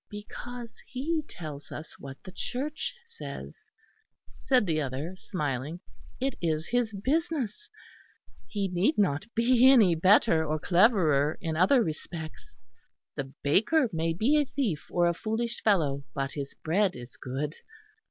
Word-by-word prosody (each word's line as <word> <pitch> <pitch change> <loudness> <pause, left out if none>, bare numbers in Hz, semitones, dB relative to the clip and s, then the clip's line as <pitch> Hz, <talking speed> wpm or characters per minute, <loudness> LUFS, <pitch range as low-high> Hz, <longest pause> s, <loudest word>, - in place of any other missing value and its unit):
"Because 230 +3 -8
he 310 +5 -1
tells 150 -4 -8
us 155 - -8
what 135 -1 -8
the 185 - -9
Church 300 - -3
says," 465 0 -8 0.9
said 255 -5 +3
the 160 -4 +1
other 145 +6 -4
smiling, 150 - -3 0.4
"it 270 0 0
is 160 -1 -1
his 245 -2 +1
business. 290 - -1 0.8
He 200 -3 -1
need 185 - +1
not 190 -1 +1
be 245 +2 +6
any 215 -10 +6
better 165 0 +5
or 155 0 -1
cleverer 170 - +3
in 160 -1 -3
other 195 - +5
respects. 160 -1 -7 0.6
The 135 -2 -4
baker 225 - +3
may 165 0 0
be 270 - +3
a - - 0
thief 230 - -2
or 175 -1 +2
a 170 - +3
foolish 225 +5 -2
fellow; 150 -10 +2
but 135 -1 -1
his 140 -2 -6
bread 190 +4 +2
is 120 +1 -10
good." 140 +4 -4
185 Hz, 140 wpm, -28 LUFS, 155-240 Hz, 0.9 s, be